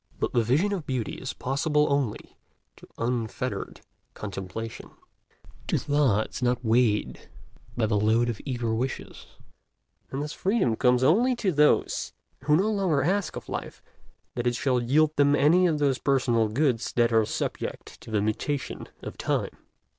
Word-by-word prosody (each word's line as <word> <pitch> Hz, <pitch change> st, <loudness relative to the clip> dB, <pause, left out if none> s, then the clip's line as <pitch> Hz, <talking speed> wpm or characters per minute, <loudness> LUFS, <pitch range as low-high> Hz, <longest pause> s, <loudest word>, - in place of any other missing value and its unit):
But -, -, -1 dB
the 120 Hz, -, +3 dB
vision 150 Hz, -, +1 dB
of 180 Hz, -7 st, -4 dB
beauty 125 Hz, -4 st, -2 dB
is 130 Hz, -, -5 dB
possible 150 Hz, +3 st, +1 dB
only 140 Hz, -6 st, -2 dB, 0.4 s
to -, -, -15 dB
unfettered 115 Hz, -2 st, -3 dB, 0.3 s
contemplation, 105 Hz, +3 st, -6 dB, 0.8 s
to -, -, +1 dB
thoughts 140 Hz, -7 st, +1 dB
not 125 Hz, 0 st, 0 dB
weighted 110 Hz, -2 st, +1 dB, 0.5 s
by 115 Hz, -, +2 dB
the 105 Hz, -1 st, +1 dB
load 110 Hz, +3 st, +3 dB
of 115 Hz, -4 st, -3 dB
eager 120 Hz, -4 st, -2 dB
wishes; 125 Hz, +4 st, -4 dB, 0.8 s
and 135 Hz, +2 st, -3 dB
thus 150 Hz, -, -5 dB
Freedom 195 Hz, -, +1 dB
comes 125 Hz, +1 st, +3 dB
only 230 Hz, -, +4 dB
to 205 Hz, -5 st, 0 dB
those 150 Hz, -1 st, +2 dB, 0.3 s
who 150 Hz, +1 st, +4 dB
no 200 Hz, +7 st, +2 dB
longer 185 Hz, -9 st, +1 dB
ask 190 Hz, +2 st, 0 dB
of -, -, -8 dB
life -, -, -6 dB, 0.5 s
that 120 Hz, 0 st, -2 dB
it 120 Hz, -, +1 dB
shall 130 Hz, -1 st, +1 dB
yield 150 Hz, +6 st, +2 dB
them 145 Hz, 0 st, +4 dB
any 170 Hz, +6 st, +4 dB
of 160 Hz, -3 st, +1 dB
those 140 Hz, -3 st, +1 dB
personal 120 Hz, -5 st, +2 dB
goods 120 Hz, +1 st, 0 dB
that 120 Hz, -1 st, +2 dB
are 110 Hz, -1 st, +5 dB
subject -, -, -5 dB
to -, -, -12 dB
the 105 Hz, -2 st, 0 dB
mutations 130 Hz, +6 st, -3 dB, 0.2 s
of -, -, -8 dB
Time. -, -, -1 dB
130 Hz, 155 wpm, -26 LUFS, 115-150 Hz, 0.8 s, are